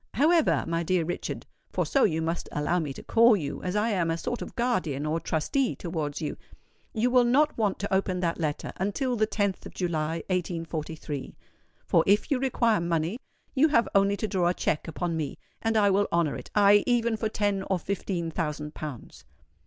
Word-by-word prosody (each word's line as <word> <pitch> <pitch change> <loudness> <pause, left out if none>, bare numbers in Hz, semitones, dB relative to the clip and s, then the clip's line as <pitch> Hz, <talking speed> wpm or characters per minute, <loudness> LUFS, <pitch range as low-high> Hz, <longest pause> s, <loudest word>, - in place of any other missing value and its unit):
However, 320 +5 +3
my 165 0 0
dear 170 0 +1
Richard—for 175 - -4
so 275 - +3
you 160 -4 0
must 165 +1 -3
allow 150 +4 0
me 150 -4 -3
to - - -9
call 230 -1 +5
you, 145 -5 -4
as 180 +1 -3
I 210 +2 +2
am 180 -6 +1
a 165 - 0
sort 240 +8 -3
of - - -7
guardian 180 - 0
or 155 +2 0
trustee 180 - 0
towards 155 -4 -4
you—you 225 +9 -5
will 250 -1 +6
not 285 +6 +3
want 210 -4 0
to 200 0 -3
open 190 -1 +1
that 170 -1 -1
letter 150 -3 -2
until 245 +7 -1
the 215 -1 +2
10th 200 -3 -1
of - - -14
July, 165 -2 -1
1843; 165 -5 -3 0.5
for 165 - +3
if 205 +9 +3
you 270 - +2
require 235 -6 +2
money, 170 +5 -1 0.3
you 290 +3 +5
have 235 -6 +3
only 200 0 +3
to 215 - -2
draw 185 -4 +1
a 180 - 0
cheque 155 - -1
upon 170 +1 -2
me, 155 -3 -3 0.2
and 225 0 +1
I 205 -2 +4
will 200 +1 +2
honour 170 -3 +1
it—aye, 205 0 +4
even 235 -2 +2
for 220 0 -2
ten 205 -2 0
or 190 - +2
fifteen 175 -2 -3
thousand 150 -2 -3
pounds." 145 -6 -8
185 Hz, 190 wpm, -27 LUFS, 165-220 Hz, 0.5 s, will